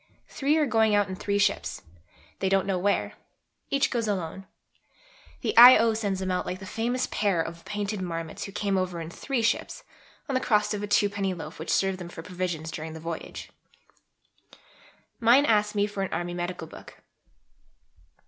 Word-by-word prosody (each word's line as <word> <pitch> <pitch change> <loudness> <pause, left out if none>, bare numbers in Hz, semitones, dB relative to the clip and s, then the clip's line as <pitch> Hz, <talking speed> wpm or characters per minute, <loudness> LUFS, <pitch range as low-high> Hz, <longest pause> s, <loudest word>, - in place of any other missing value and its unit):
Three 290 +3 +1
are 310 - +3
going 220 -4 +3
out 205 -1 +3
in 185 - -4
three 200 +2 -1
ships 205 0 0 0.6
they 190 - 0
don't 195 0 +2
know 190 -2 0
where 200 +2 0 0.6
each 275 0 +1
goes 235 -3 -1
alone. 190 -1 -3 0.9
(The - - -2
I.O. 235 -1 +9
sends 205 -4 -2
them 190 -1 -2
out 180 - 0
like 180 - -4
the 190 - -10
famous 240 +6 -1
pair 200 -5 +1
of 170 +1 -4
Painted 205 -1 -3
Marmots 165 -3 -5
who 195 - -8
came 200 -1 -1
over 180 -2 -3
in 165 0 -6
three 255 +4 -2
ships, 230 - -1 0.4
on 275 - -3
the 255 - +1
crust 210 -3 +2
of 205 - -3
a 205 - -3
twopenny 200 -2 +1
loaf 155 -2 -9
which 160 - -6
served 195 -1 +1
them 175 -1 -7
for 165 -1 -9
provisions 175 -3 -4
during 160 0 -6
the 160 - -8
voyage.) 165 0 -7 1.7
Mine 245 +4 +5
asks 210 -3 +2
me 205 0 +2
for 205 -1 -5
an 195 - -2
Army 175 +1 -3
Medical 175 -1 -4
Book. - - -14
195 Hz, 180 wpm, -27 LUFS, 175-215 Hz, 1.7 s, I.O